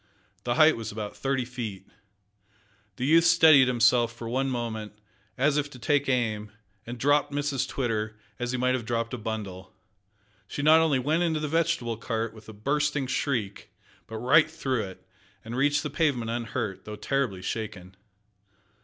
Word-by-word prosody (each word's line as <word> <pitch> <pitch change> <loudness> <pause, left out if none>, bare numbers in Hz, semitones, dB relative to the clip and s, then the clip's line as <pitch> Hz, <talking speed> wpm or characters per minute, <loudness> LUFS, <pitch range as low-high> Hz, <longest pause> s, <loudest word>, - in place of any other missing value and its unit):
The 120 - 0
height 155 0 +6
was 115 -1 -5
about 105 -1 -6
thirty 135 -2 -1
feet. 115 -6 -6 1.1
The 125 - -3
youth 165 +4 +5
steadied 160 -5 +7
himself 120 -1 +3
for 115 0 -8
one 130 +3 0
moment, 110 -4 -4 0.4
as 140 +3 +2
if 145 0 0
to 130 - -12
take 145 +3 +1
aim, 110 -5 -1 0.4
and 120 +1 -6
dropped 145 +3 +2
Mrs 140 -2 -1
Twitter, 110 -5 -2 0.2
as 120 0 -2
he 130 - -1
might 125 +1 +2
have 130 -2 -1
dropped 115 0 -2
a - - -2
bundle. 100 -4 -6 0.7
She 145 - -4
not 155 +2 +7
only 160 -4 +3
went 150 +6 +1
into 165 -3 +1
the 150 - -2
vegetable 160 -7 0
cart, 115 -1 -3
with 110 0 -14
a - - -6
bursting 145 +5 0
shriek, 125 -6 -2 0.4
but 110 - -6
right 125 +6 +4
through 130 -8 -2
it, 95 -1 -12 0.4
and 115 +2 -6
reached 145 +3 +2
the 150 - -4
pavement 135 -8 0
unhurt 115 -3 -4
though 105 - -6
terribly 105 -4 -2
shaken! 95 -3 -5
125 Hz, 170 wpm, -27 LUFS, 110-145 Hz, 1.1 s, steadied